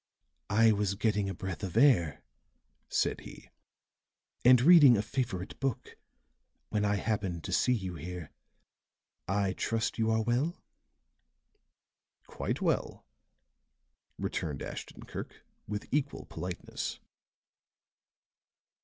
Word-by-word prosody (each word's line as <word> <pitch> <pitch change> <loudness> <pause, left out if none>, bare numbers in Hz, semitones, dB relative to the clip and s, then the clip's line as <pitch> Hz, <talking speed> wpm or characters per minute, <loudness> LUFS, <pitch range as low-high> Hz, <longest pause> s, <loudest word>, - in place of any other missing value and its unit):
"I 110 +1 +5
was 100 -2 0
getting 105 -1 0
a - - -3
breath 95 -1 -5
of 95 -4 -4
air," 85 - +4 0.7
said - - +1
he, - - -12 0.9
"and 125 0 +8
reading 145 -4 +8
a 100 - 0
favorite 105 -5 -3
book, 135 -3 -3 0.7
when 105 -1 0
I 105 0 +2
happened 100 -5 -2
to - - -5
see 125 - +3
you 95 -6 -3
here. 85 0 -7 1.0
I 95 0 +1
trust 115 +3 -1
you 110 0 +2
are 110 0 +2
well?" 125 +9 0 1.7
"Quite - - -3
well," - - -1 1.1
returned 75 -4 -3
Ashton - - -7
Kirk, - - -8 0.2
with 105 0 -4
equal 145 0 -1
politeness. 90 +2 -5
105 Hz, 110 wpm, -31 LUFS, 95-120 Hz, 1.7 s, and